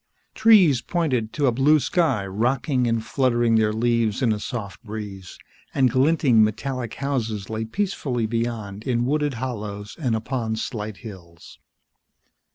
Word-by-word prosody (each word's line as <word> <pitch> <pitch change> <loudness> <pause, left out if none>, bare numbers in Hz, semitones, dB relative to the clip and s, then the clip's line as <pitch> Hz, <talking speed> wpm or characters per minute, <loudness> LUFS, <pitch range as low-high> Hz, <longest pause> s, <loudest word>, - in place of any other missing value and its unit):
Trees 190 - +5
pointed 130 -11 -1
to 145 - 0
a 130 - +4
blue 140 +6 +4
sky, 135 - +1
rocking 125 +6 0
and 115 -1 -1
fluttering 120 -3 +1
their 110 -1 +3
leaves 115 +1 0
in 115 -3 +3
a 105 - -4
soft 105 -5 -6
breeze, 105 -4 -8 0.4
and 130 -3 +3
glinting 130 -3 +4
metallic 120 +2 -2
houses 115 -8 -3
lay 110 0 -2
peacefully 130 - -2
beyond 110 -3 -3
in 120 -1 0
wooded 145 0 0
hollows 105 -4 -5
and 125 -7 0
upon 115 0 -2
slight 110 -3 -5
hills. 85 -5 -12
115 Hz, 140 wpm, -23 LUFS, 110-135 Hz, 0.4 s, Trees